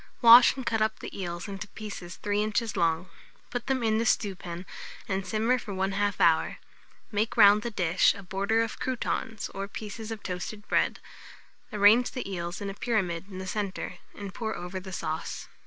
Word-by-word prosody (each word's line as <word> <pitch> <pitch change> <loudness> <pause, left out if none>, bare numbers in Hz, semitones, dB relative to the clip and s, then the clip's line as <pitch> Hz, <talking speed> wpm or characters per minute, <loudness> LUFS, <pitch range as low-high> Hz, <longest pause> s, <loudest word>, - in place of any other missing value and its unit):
Wash, 235 +2 +9
and 260 -2 -6
cut 225 -1 0
up 220 0 +1
the - - -8
eels 175 0 -4
into 195 0 -6
pieces 195 -4 -8
3 205 0 +1
inches 215 +1 -1
long; 170 0 +1 0.4
put 245 -1 -4
them 265 -2 0
in 220 -1 +2
the 230 - 0
stewpan, 180 -4 -1 0.4
and 190 0 -2
simmer 225 +6 +1
for 205 -3 -6
1/2 195 +1 0
hour. 165 -2 +3 0.5
Make 215 +3 -1
round 205 -1 +8
the 235 - -3
dish, 185 -5 +3
a 200 - -9
border 200 +5 +1
of 230 - -5
croutons, 225 -3 -2
or 195 0 -5
pieces 215 +2 -7
of 220 -2 -6
toasted 200 +3 -5
bread; - - +1 0.7
arrange 210 +4 +5
the 250 - -4
eels 175 0 -4
in 200 -1 -3
a - - -8
pyramid 190 -6 -1
in 185 - -8
the 190 - -5
centre, 190 -2 -4 0.2
and 200 -2 -7
pour 220 +1 -3
over 180 +2 -5
the 190 0 -9
sauce. 160 -3 -4
205 Hz, 185 wpm, -28 LUFS, 185-220 Hz, 0.7 s, Wash